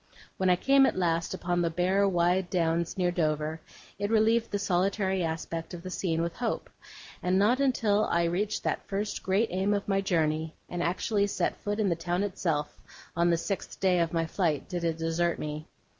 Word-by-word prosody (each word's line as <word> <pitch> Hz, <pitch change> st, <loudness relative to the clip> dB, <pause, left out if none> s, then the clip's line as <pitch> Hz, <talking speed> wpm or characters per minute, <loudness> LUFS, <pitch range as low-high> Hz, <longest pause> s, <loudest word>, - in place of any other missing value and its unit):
When 190 Hz, -1 st, +2 dB
I 180 Hz, -, +6 dB
came, 270 Hz, +8 st, +4 dB
at -, -, -1 dB
last, 170 Hz, -2 st, 0 dB
upon 175 Hz, 0 st, -1 dB
the 170 Hz, -, +1 dB
bare, 185 Hz, +4 st, +2 dB
wide 175 Hz, 0 st, +1 dB
downs 170 Hz, -1 st, 0 dB
near 180 Hz, -1 st, +2 dB
Dover, 155 Hz, -1 st, -1 dB, 0.4 s
it 205 Hz, 0 st, -1 dB
relieved 225 Hz, +1 st, +3 dB
the 205 Hz, -, -1 dB
solitary 190 Hz, 0 st, 0 dB
aspect 165 Hz, +1 st, -4 dB
of 170 Hz, -, -10 dB
the 185 Hz, -, -6 dB
scene 165 Hz, -3 st, -1 dB
with 170 Hz, 0 st, -4 dB
hope; 235 Hz, -1 st, -3 dB, 0.5 s
and 180 Hz, +1 st, +1 dB
not 220 Hz, +6 st, +3 dB
until 225 Hz, -6 st, +2 dB
I 170 Hz, 0 st, +1 dB
reached 185 Hz, +5 st, -1 dB
that -, -, -2 dB
first 205 Hz, +1 st, -3 dB
great 200 Hz, +4 st, +1 dB
aim 190 Hz, +3 st, +1 dB
of 200 Hz, -, -3 dB
my 195 Hz, -1 st, +2 dB
journey, 160 Hz, -4 st, 0 dB
and 175 Hz, -, -4 dB
actually 200 Hz, +4 st, +1 dB
set 200 Hz, -, -1 dB
foot 205 Hz, +1 st, -3 dB
in 205 Hz, -3 st, +2 dB
the 170 Hz, -, +1 dB
town 175 Hz, +3 st, -1 dB
itself, 165 Hz, -7 st, -2 dB, 0.3 s
on 170 Hz, +1 st, +3 dB
the 170 Hz, -, +3 dB
sixth 190 Hz, +3 st, -4 dB
day 185 Hz, -2 st, +3 dB
of 165 Hz, -1 st, +1 dB
my 165 Hz, -1 st, 0 dB
flight, 160 Hz, -3 st, -1 dB
did 175 Hz, -3 st, -4 dB
it 165 Hz, -1 st, 0 dB
desert 165 Hz, +1 st, 0 dB
me. 150 Hz, 0 st, -5 dB
180 Hz, 200 wpm, -28 LUFS, 165-200 Hz, 0.5 s, I